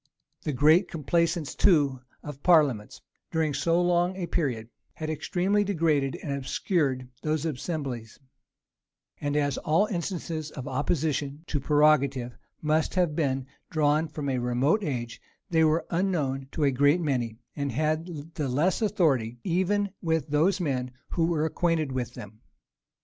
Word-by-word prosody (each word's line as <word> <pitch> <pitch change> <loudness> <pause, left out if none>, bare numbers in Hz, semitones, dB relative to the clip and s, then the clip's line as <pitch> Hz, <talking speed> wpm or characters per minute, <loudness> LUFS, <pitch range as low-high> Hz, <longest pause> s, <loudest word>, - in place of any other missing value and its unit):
The 150 - -2
great 155 +7 +4
complaisance 165 0 0
too 145 -8 +3 0.2
of 145 -2 -8
parliaments, 145 - +3 0.3
during 160 -3 +1
so 165 +5 +2
long 175 +1 +2
a 185 -2 -3
period, 125 -10 -2 0.3
had 155 0 -4
extremely 190 +6 +1
degraded 160 -8 +1
and 140 - -2
obscured 135 -1 -1
those 155 0 -1
assemblies; 140 -6 -4 1.0
and 145 0 -1
as 145 -2 0
all 160 +7 +2
instances 170 -5 -3
of 135 -3 -8
opposition 145 +1 -1
to 150 - -2
prerogative 140 -4 +3 0.3
must 155 +3 +1
have 175 -5 +2
been 135 -4 0 0.2
drawn 155 +1 +2
from 150 -2 -5
a 130 -2 0
remote 125 - +1
age, 120 -7 -4 0.3
they 160 -1 +4
were 160 +1 +2
unknown 155 -7 0
to 155 - -1
a 140 - +4
great 145 +6 +3
many, 125 -8 -1 0.2
and 140 -1 -2
had 155 +3 -2
the 145 -4 -2
less 160 - +1
authority 145 - +1
even 190 +3 +1
with 160 -3 0
those 160 +6 +3 0.5
who 165 -2 +1
were 160 -2 +1
acquainted 160 -3 0
with 125 -2 -3
them. 105 +1 -10
155 Hz, 140 wpm, -27 LUFS, 135-170 Hz, 1.0 s, great